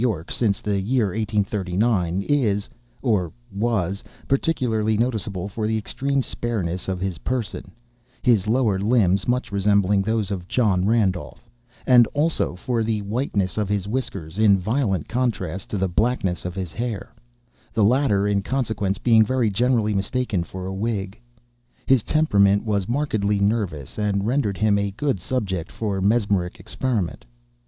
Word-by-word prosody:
Y., 105 -10 0
since 105 -5 0
the 100 -2 0
year 110 +1 +1
1839, 100 -2 0
is 110 -8 +1 0.4
(or 95 -8 +1 0.2
was) 100 -3 -1 0.2
particularly 115 -7 +1
noticeable 110 -5 -1
for 105 +2 -3
the 110 0 0
extreme 135 +5 -1
spareness 95 -9 -3
of 95 -1 -2
his 95 -2 -3
person—his 120 -2 -2
lower 110 -4 +2
limbs 100 -3 +2
much 125 -1 0
resembling 100 0 +3
those 110 -1 -1
of 90 -3 -4
John 100 -7 +2
Randolph; 105 -1 0 0.4
and, 120 -3 +6
also, 155 - +1
for 115 +5 -1
the 110 -2 -1
whiteness 100 - -1
of 105 -2 -1
his 100 -2 -1
whiskers, 100 -7 -4
in 105 -3 +6
violent 100 - -1
contrast 100 -8 -2
to 105 - -2
the 95 0 +1
blackness 95 -2 0
of 90 0 -4
his 95 -4 -5
hair—the 120 0 -5
latter, 105 -3 +3
in 100 -1 +1
consequence, 105 -5 -1
being 115 -2 +5
very 120 -1 +1
generally 115 0 +2
mistaken 100 -1 -1
for 95 +2 -7
a 95 - -4
wig. 100 -1 -2 0.7
His 135 -3 +4
temperament 100 -9 +3
was 100 -2 -1
markedly 110 -7 0
nervous, 100 - -1
and 100 -1 0
rendered 115 -5 0
him 105 -1 +3
a 100 0 0
good 140 -8 0
subject 95 -5 -3
for 100 -4 -2
mesmeric 100 -4 +1
experiment. 105 - -2
105 Hz, 145 wpm, -23 LUFS, 95-120 Hz, 0.7 s, and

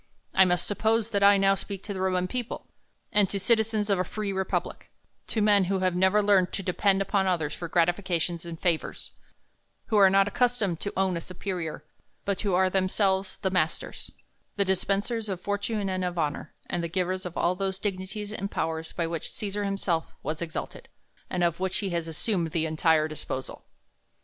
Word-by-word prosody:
I 190 - +6
must 180 -1 +1
suppose, 220 +2 +1
that 200 -2 +1
I 200 0 +7
now 195 0 +4
speak 195 0 -5
to 205 - -4
the 190 - -4
Roman 185 -1 +1
people, 245 +3 -4 0.5
and 205 -2 +4
to 200 - -1
citizens 220 0 +2
of 200 -3 +2
a - - +2
free 200 +2 -3
republic; 190 0 -2 0.4
to 220 - 0
men 205 -2 +5
who 195 +2 0
have 185 -1 +2
never 190 +3 +4
learned 195 -3 +4
to 195 - -3
depend 195 +2 +2
upon 195 0 +1
others 160 -5 0
for 170 - -5
gratifications 175 0 +1
and 170 -1 -7
favours; 170 -4 -1 0.8
who 220 - +3
are 195 -2 +8
not 195 +1 +4
accustomed 235 - +1
to 200 - -4
own 190 -2 +2
a - - -4
superior, 180 -3 -5 0.4
but 200 -1 -1
who 200 -4 +1
are 190 +1 +4
themselves 190 0 +1
the 190 - -1
masters, 170 -3 -2 0.5
the 200 - +2
dispensers 200 +4 0
of 190 -3 -3
fortune 205 +1 -2
and 185 -1 -1
of 180 -1 -2
honor, 150 -1 -2
and 175 - -2
the - - -1
givers 185 +1 -1
of 180 -2 -6
all 175 - +2
those 190 0 -2
dignities 200 +1 -4
and 200 -1 -3
powers 160 -2 -3
by 170 - -1
which 165 -1 -3
Cesar 205 0 -2
himself 195 -4 0
was 155 +1 -3
exalted, 165 -2 -5 0.4
and 180 -1 0
of 170 0 +1
which 190 0 -1
he 195 -4 -2
as 170 -1 -1
sumed 165 0 -1
the 165 -2 +1
entire 160 0 +3
disposal. 140 -3 -6
190 Hz, 190 wpm, -27 LUFS, 175-200 Hz, 0.8 s, are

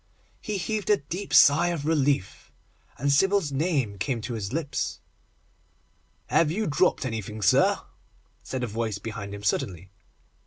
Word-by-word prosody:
He 210 -2 -3
heaved 210 +3 -3
a 210 - +5
deep 180 +7 -6
sigh 145 +5 +6
of 170 -4 -2
relief, 145 - 0 0.5
and 140 +2 0
Sybil's 195 +1 +3
name 135 - -1
came 130 -5 -1
to 120 - -5
his 105 -4 -4
lips. 155 -1 -3 1.3
'Have 165 - +2
you 210 +7 -1
dropped 150 -2 +1
anything, 110 -3 -4
sir?' - - +4 0.6
said 130 -1 -4
a - - +1
voice 110 -1 -3
behind 105 -1 -6
him 100 0 -8
suddenly. 95 -2 -2
140 Hz, 145 wpm, -26 LUFS, 110-170 Hz, 1.3 s, sigh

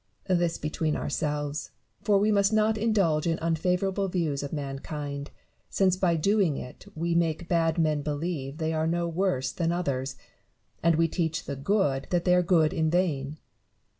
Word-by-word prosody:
This 175 -2 +2
between 155 0 -1
ourselves; 145 0 -2 0.3
for 205 -1 +3
we 210 +2 +3
must 200 0 +3
not 215 0 +3
indulge 200 -9 +1
in 165 -1 +1
unfavourable 180 +4 0
views 165 -6 -1
of 140 - -5
mankind, 140 0 -5 0.4
since 190 -2 +2
by 185 -2 +2
doing 190 -2 +2
it 125 - -9
we 170 +2 -1
make 170 0 0
bad 165 -1 +1
men 155 -3 +2
believe 145 -1 -3
that 160 - -3
they 160 - 0
are 160 0 0
no 170 +1 0
worse 170 -6 0
than 170 -1 -1
others, 140 -6 -2 0.7
and 170 -1 +4
we 165 +1 +3
teach 165 -1 -2
the 140 - -4
good 140 -3 0
that 175 -1 0
they 180 - +4
are 180 - +5
good 170 -2 +3
in 160 -3 +1
vain. 155 -5 0
165 Hz, 170 wpm, -27 LUFS, 150-180 Hz, 0.7 s, are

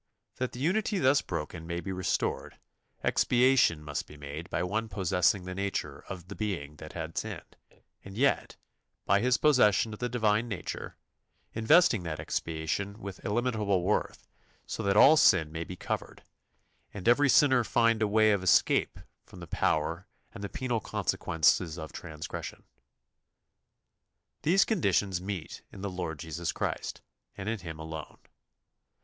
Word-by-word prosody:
That 130 0 -2
the 120 - -8
unity 200 +8 +1
thus 135 -2 +4
broken 85 0 -5
may 85 0 -3
be 90 +3 -5
restored, 95 -1 -2 0.5
expiation 125 - +3
must 75 -2 -4
be 75 - -13
made 75 +3 -7
by 85 - -1
one 110 +5 -2
possessing 90 -1 +1
the 90 - -5
nature 100 +1 -3
of 90 -2 -7
the - - -7
being 85 -9 -4
that 75 0 -10
had 80 -1 -6
sinned, - - -7 0.5
and 95 +1 -10
yet, 140 +3 +1 0.5
by 100 - +4
His 125 +3 +2
possession 115 -7 +4
of 105 - -9
the 125 - -2
Divine 110 -1 +1
nature, 100 -7 -6 0.6
investing 115 - +4
that 80 -3 -5
expiation 85 +6 -3
with 100 -3 -8
illimitable 105 -4 0
worth, 105 +4 -1 0.4
so - - -5
that 100 +1 +1
all 150 +8 +8
sin 80 - +5
may 80 +1 -4
be 90 +2 -8
covered, - - -5 0.7
and 100 -1 -7
every 140 +4 +5
sinner 130 -3 +5
find 115 0 +2
a 110 - +3
way 110 +1 +4
of 100 -2 +1
escape 95 -2 +3 0.3
from 90 - -14
the 85 - -8
power 80 +2 -1 0.3
and 100 - -8
the 100 - -4
penal 125 0 -2
consequences 80 -3 +1
of 80 -2 -7
transgression. 80 -3 -7 1.8
These 185 +5 +4
conditions 100 - +1
meet 95 -4 -6
in 95 - -10
the 100 -1 -3
Lord 85 -4 -4
Jesus 80 +1 -4
Christ - - -4 0.3
and 95 - -6
in 115 -1 -1
Him 80 -3 -7
alone. 80 -1 -8
100 Hz, 155 wpm, -29 LUFS, 85-115 Hz, 1.8 s, all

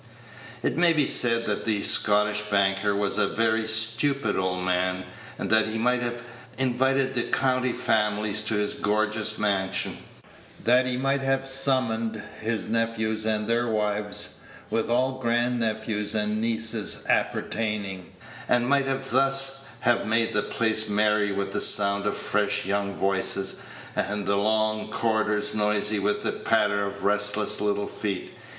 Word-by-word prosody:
It - - 0
may 175 -1 +5
be 150 -3 +2
said 115 -2 +2
that 105 - -2
the 105 -2 0
Scottish 105 0 +3
banker 100 0 +2
was 100 0 0
a - - +3
very 110 0 +1
stupid 115 +2 +1
old 90 -1 -1
man, 90 0 0 0.3
and - - -3
that 110 0 +4
he 110 0 -3
might 125 +2 +1
have 120 0 -4 0.3
invited 130 +1 +1
the 120 - +2
county 130 -1 +1
families 105 -1 +1
to 110 - 0
his 105 0 0
gorgeous 105 +1 0
mansion; 100 -2 -1 0.6
that 125 +2 +4
he 125 -1 -1
might 135 +1 0
have 135 0 0
summoned 130 -5 0 0.2
his 110 0 -2
nephews 110 -1 -1
and 105 -1 -1
their 120 +1 +1
wives, 105 -2 -2 0.3
with 115 0 -1
all 130 +2 +1
grand 120 0 0
nephews 110 -1 -2
and 105 0 -1
nieces 110 -1 -3
appertaining, 100 -5 -2 0.4
and 120 0 +2
might 140 0 +2 0.2
thus 135 +1 +1
have 120 -3 +1
made 115 +1 +2
the 105 - +2
place 110 0 0
merry 105 0 +2
with 100 0 -3
the - - -1
sound 100 -1 +4
of - - -1
fresh 105 -2 0
young 100 0 -1
voices, 95 0 -1 0.4
and 105 +1 -2
the 100 - +1
long 110 +1 0
corridors 105 -2 0
noisy 105 0 +1
with 105 +1 -1
the - - 0
patter 100 -2 +1
of 100 0 -8
restless 105 +1 0
little 105 0 0
feet. 100 -3 -4
110 Hz, 150 wpm, -25 LUFS, 105-120 Hz, 0.6 s, may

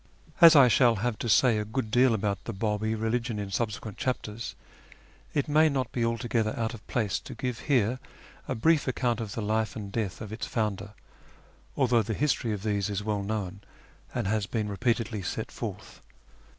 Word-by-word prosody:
As 165 -1 +10
I 140 -3 +8
shall 120 -1 +4
have 110 +2 -2
to 120 - -2
say 110 +3 +4
a - - -1
good 110 +1 -3
deal 125 0 +4
about 100 -2 -2
the 115 - -4
Babi 105 +2 -1
religion 115 +1 -1
in 100 -1 -4
subsequent 105 -1 -3
chapters, 115 -3 -3 0.8
it 145 - +1
may 155 +1 +5
not 130 -4 -1
be 120 - -1
altogether 115 -1 0
out 115 +1 -1
of 115 - -9
place 105 -5 0
to - - -10
give 125 -4 -3
here 125 -2 +2 0.5
a - - -2
brief 160 +5 +3
account 120 -2 0
of 105 -3 -5
the 115 - -3
life 110 +1 0
and 100 -3 -6
death 105 -3 -2
of 110 -1 -7
its 110 - -4
founder, 105 -3 -2 0.8
although 125 -4 +3
the 110 0 -3
history 130 -4 0
of 105 -2 -4
these 105 -2 0
is 100 0 -2
well 105 -1 -1
known, 100 -2 -4 0.5
and 120 -3 -2
has 105 -1 0
been 110 -3 -2
repeatedly 115 0 -1
set 90 - -4
forth. - - -7
110 Hz, 190 wpm, -28 LUFS, 105-120 Hz, 0.8 s, As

